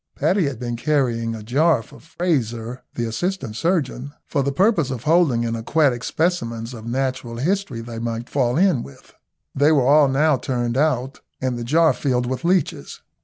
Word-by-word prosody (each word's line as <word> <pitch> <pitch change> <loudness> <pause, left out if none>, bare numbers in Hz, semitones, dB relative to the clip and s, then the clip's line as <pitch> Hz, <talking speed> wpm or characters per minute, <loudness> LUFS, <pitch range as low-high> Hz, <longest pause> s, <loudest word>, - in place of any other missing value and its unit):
Paddy 190 -3 +2
had 140 -4 -4
been 120 0 -4
carrying 120 -5 0
a 110 - -8
jar 140 +3 +2
for - - -16
Frazer, 125 -8 -2
the 120 - -1
assistant 130 - -3
surgeon, 145 -3 -1
for 145 - -1
the 140 +1 0
purpose 180 - +2
of 130 -3 -5
holding 150 -8 +3
any 115 0 -2
aquatic 130 0 +1
specimens 120 -9 -1
of 115 -1 -9
natural 130 -1 -2
history 160 -3 -1
they 115 0 -7
might 115 0 -4
fall 130 -2 0
in 180 -8 +3
with. 70 - -13 0.4
They 145 +3 +3
were 140 -5 +3
all 145 +2 +6
now 145 +2 +2
turned 120 -1 -2
out, 135 -2 0 0.2
and 130 -1 -1
the 120 - -4
jar 160 +6 +3
filled 125 -3 0
with 130 +5 -3
leeches. 175 -2 -1
130 Hz, 175 wpm, -21 LUFS, 120-155 Hz, 0.4 s, all